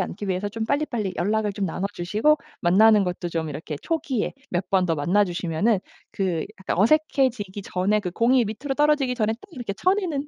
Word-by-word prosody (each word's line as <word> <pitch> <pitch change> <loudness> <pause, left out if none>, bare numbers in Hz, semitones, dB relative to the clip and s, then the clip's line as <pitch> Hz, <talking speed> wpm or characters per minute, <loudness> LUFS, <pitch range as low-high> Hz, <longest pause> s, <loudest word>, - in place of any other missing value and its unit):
않기 190 +2 -4
위해서 190 +2 -1
좀 220 +2 -4
빨리빨리 240 -9 -1
연락을 210 +3 0
좀 200 0 -3
나눠 185 +2 -2
주시고 215 - +2 0.2
만나는 205 +3 +5
것도 180 0 -3
좀 165 -2 -2
이렇게 150 +1 -5
초기에 300 -8 -2 0.2
몇 180 +1 -2
번 190 -1 +3
더 165 - +1
만나 180 +8 +3
주시면은 175 +4 0 0.3
그 180 -5 -1 0.2
약간 - - -2
어색해지기 235 -5 +2
전에 195 +4 0
그 180 -3 -4
공이 240 +5 +3
밑으로 255 +7 -4
떨어지기 295 -4 +2
전에 220 -2 +1
딱 230 - -9
이렇게 245 -8 -5
쳐내는 360 - 0
210 Hz, 405 characters per minute, -24 LUFS, 180-255 Hz, 0.3 s, 만나는